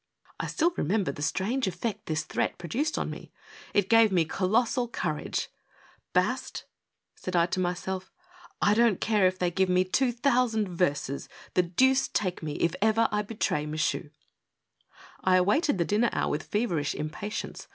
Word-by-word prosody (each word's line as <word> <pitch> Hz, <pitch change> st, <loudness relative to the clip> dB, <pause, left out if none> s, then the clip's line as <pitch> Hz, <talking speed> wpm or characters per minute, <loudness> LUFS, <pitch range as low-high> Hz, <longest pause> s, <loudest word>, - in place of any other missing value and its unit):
I -, -, -2 dB
still 340 Hz, +1 st, +1 dB
remember 190 Hz, -1 st, +1 dB
the 145 Hz, -, -9 dB
strange 210 Hz, -, 0 dB
effect 210 Hz, +2 st, -4 dB
this 155 Hz, -1 st, -1 dB
threat -, -, -2 dB
pro 175 Hz, -, -8 dB
duced 295 Hz, -, -1 dB
on -, -, -2 dB
me. -, -, -9 dB, 0.4 s
It 200 Hz, -2 st, +2 dB
gave 225 Hz, -1 st, +5 dB
me 175 Hz, -3 st, +3 dB
colossal 230 Hz, -, +1 dB
courage^ 155 Hz, -9 st, -2 dB, 0.3 s
" -, -, -30 dB
Bast! -, -, -3 dB, 0.3 s
" -, -, -57 dB
said 185 Hz, -, -4 dB
I 170 Hz, -1 st, +5 dB
to 180 Hz, +1 st, -2 dB
myself, 185 Hz, +1 st, -3 dB, 0.3 s
" 350 Hz, -1 st, -23 dB
I 205 Hz, -, +5 dB
don't 230 Hz, -3 st, +3 dB
care 210 Hz, -4 st, +3 dB
if 185 Hz, 0 st, -1 dB
they 180 Hz, -1 st, 0 dB
give 190 Hz, +1 st, +1 dB
me 180 Hz, 0 st, +4 dB
two 245 Hz, +7 st, +1 dB
thou 250 Hz, +1 st, +2 dB
sand 220 Hz, -2 st, -1 dB
verses; 145 Hz, -6 st, -1 dB, 0.2 s
the 180 Hz, -, +4 dB
deuce 260 Hz, +10 st, +3 dB
take 185 Hz, -3 st, -2 dB
me 155 Hz, -2 st, -4 dB
if 170 Hz, +1 st, 0 dB
ever 220 Hz, +1 st, +3 dB
I 210 Hz, 0 st, +1 dB
betray 200 Hz, -8 st, -2 dB
Michu!" 155 Hz, 0 st, -1 dB, 1.1 s
I 185 Hz, 0 st, +4 dB
awaited 205 Hz, -, +3 dB
the 170 Hz, -, +1 dB
dinner 220 Hz, +5 st, +2 dB
hour -, -, 0 dB
with 150 Hz, +2 st, -4 dB
feverish 175 Hz, -10 st, 0 dB
impatience. 175 Hz, +8 st, -5 dB
190 Hz, 180 wpm, -28 LUFS, 175-230 Hz, 1.1 s, gave